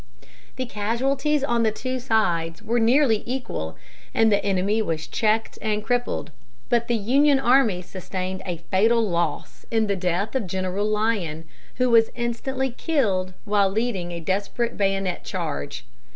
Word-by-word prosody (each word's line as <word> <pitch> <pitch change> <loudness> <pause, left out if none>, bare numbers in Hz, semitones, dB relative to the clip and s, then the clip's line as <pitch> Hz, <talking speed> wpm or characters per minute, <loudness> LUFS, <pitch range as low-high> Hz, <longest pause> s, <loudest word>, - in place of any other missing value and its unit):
The 255 - -2
casualties 265 +7 0
on 235 -4 +1
the 220 -1 +3
two 255 +4 -3
sides 175 -9 0
were 240 +2 +1
nearly 235 -1 +4
equal, 240 - -4 0.4
and 225 -1 +4
the 205 0 +2
enemy 200 +2 +1
was 160 -6 -2
checked 220 0 0
and 215 -1 -1
crippled; 245 +2 -1 0.4
but 235 -1 +2
the 240 - +1
Union 270 +7 +4
army 245 -8 +3
sustained 185 +1 -5
a 175 -3 -4
fatal 225 +4 +3
loss 170 -5 -2
in 225 -1 +2
the 200 -1 0
death 180 +3 -1
of 255 -7 -1
General 185 +3 -1
Lyon, 210 -7 -1 0.3
who 250 -1 +2
was 225 -1 +6
instantly 255 +2 -2
killed 205 - 0
while 205 -2 +3
leading 195 -4 -1
a 170 - -4
desperate 200 +7 -1
bayonet 195 -2 0
charge. 70 -3 -4
215 Hz, 150 wpm, -24 LUFS, 185-240 Hz, 0.4 s, was